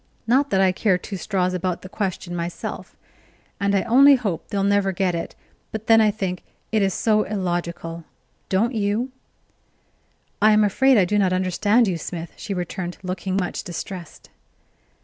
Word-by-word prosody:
Not 270 +5 +3
that 190 - +2
I 190 -1 +4
care 185 0 +1
two 195 +3 -7
straws 185 -1 -1
about 180 -1 -2
the - - -7
question 185 -3 -4
myself, 170 0 -5 0.6
and 200 0 +1
I 195 - +2
only 275 +4 +7
hope 205 -10 -3
they'll 200 -1 -1
never 200 -1 +2
get 185 -1 0
it; 170 - -4 0.4
but 220 0 -5
then 225 -1 +6
I 215 - +4
think 190 -4 -3 0.3
it 220 -2 +2
is 195 -2 +1
so 215 -1 +2
illogical 175 -4 -3 0.5
don't 220 +7 +1
you?" 220 +4 -1 1.3
"I 215 +1 +6
am 210 0 +5
afraid 260 +6 +4
I 195 - +5
do 210 +3 +1
not 185 -2 +2
understand 205 +5 +2
you, 175 -3 -1
Smith," 165 +1 -6
she 210 - -8
returned, 180 0 -4
looking 185 +1 -3
much 180 -2 -2
distressed. 180 -2 -8
195 Hz, 170 wpm, -23 LUFS, 180-215 Hz, 1.3 s, only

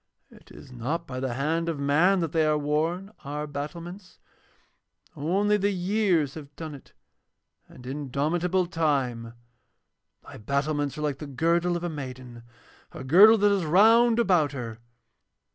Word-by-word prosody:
'It - - -19
is - - -14
not 135 +8 -4
by 130 -5 -6
the 130 -2 -3
hand 165 +5 -1
of 165 - -3
man 165 +7 +3
that 165 -3 -2
they 160 -1 +2
are 155 0 +2
worn, 160 +7 -2
our 150 +1 -4
battlements. 170 +6 -8 1.0
Only 195 +8 +1
the 200 0 +1
years 185 -6 0
have 145 -2 -11
done 160 -2 -7
it 140 - -14 0.8
and 125 - -14
indomitable 150 +7 -1
Time. 135 -9 -2 0.9
Thy - - -12
battlements 140 +5 -2
are - - -5
like 145 -2 -2
the 150 - -7
girdle 170 +5 0
of 175 - -8
a - - -1
maiden, 130 -5 -8 0.5
a - - -8
girdle 200 +11 +7
that 205 0 +3
is 195 -3 +1
round 225 +8 +5
about 175 -11 +2
her. 115 -4 -6
155 Hz, 150 wpm, -26 LUFS, 140-180 Hz, 1.0 s, girdle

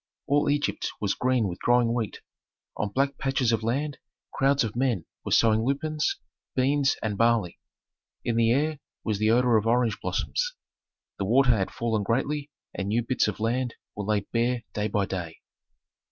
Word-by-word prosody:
All 145 +1 +2
Egypt 145 0 0
was 100 -2 0
green 125 -4 +1
with 90 -1 -5
growing 120 -1 +3
wheat. 115 -4 -3 0.5
On 105 - -2
black 135 +5 0
patches 135 -3 +1
of 115 - +1
land 140 +6 -1 0.3
crowds 140 0 +3
of 110 -1 -4
men 120 -9 0 0.2
were - - -5
sowing 110 -1 +4
lupines, 150 +4 0 0.4
beans, 135 +1 +2
and 105 -2 -2
barley. 115 -6 +2 0.7
In 120 - 0
the 115 0 +3
air 150 +3 +1 0.2
was 110 -3 -1
the 110 0 +2
odor 120 0 +4
of 110 +1 0
orange 115 -2 +2
blossoms. - - -1 0.6
The 100 - 0
water 125 +5 +4
had 100 -5 +1
fallen 115 -2 -1
greatly 140 +7 -1 0.2
and 100 - -3
new 115 +3 +1
bits 125 0 +1
of 105 - -3
land 120 +2 -1 0.2
were 105 - -4
laid 105 -1 0
bare 120 +1 +1
day 105 0 -1
by 100 -1 0
day. 90 -4 -5
120 Hz, 170 wpm, -27 LUFS, 110-135 Hz, 0.7 s, sowing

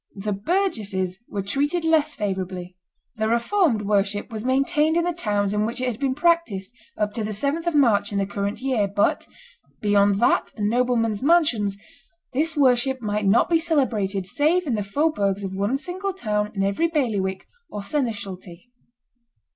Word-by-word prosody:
The 205 +1 -3
burgesses 200 - -1
were 200 -1 -3
treated 290 - -1
less 310 -2 +2
favorably; 185 -3 -4 0.4
the 220 0 0
Reformed 235 - +2
worship 205 +2 0
was 220 -1 -5
maintained 295 +5 +2
in 340 - +2
the 350 0 0
towns 205 - 0
in 210 0 +1
which 230 +3 -3
it 255 0 0
had 225 - -9
been 270 -2 0
practised 295 - +1 0.2
up 210 -1 -1
to 225 - -3
the 210 - -3
7th 280 - -2
of 340 - 0
March 215 -8 +3
in 200 - -2
the 200 - +1
current 200 +2 -3
year; 255 -6 +1
but, 200 +1 0 0.5
beyond 205 -1 +3
that 235 - +2
and 210 0 0
noblemen's 235 -3 +1
mansions, 255 - +2 0.6
this 315 +4 0
worship 260 -1 +3
might 210 -2 -1
not 200 +4 +4
be 335 -1 +3
celebrated 225 - 0
save 310 - +1
in 270 - -1
the 210 - 0
faubourgs 200 -3 0
of 190 -1 -4
one 200 +7 0
single 375 +6 -4
town 210 - -2
in 195 - 0
every 200 +12 +1
bailiwick 215 - -1 0.2
or 205 - -5
seneschalty. 200 - -4
220 Hz, 170 wpm, -23 LUFS, 200-290 Hz, 0.6 s, not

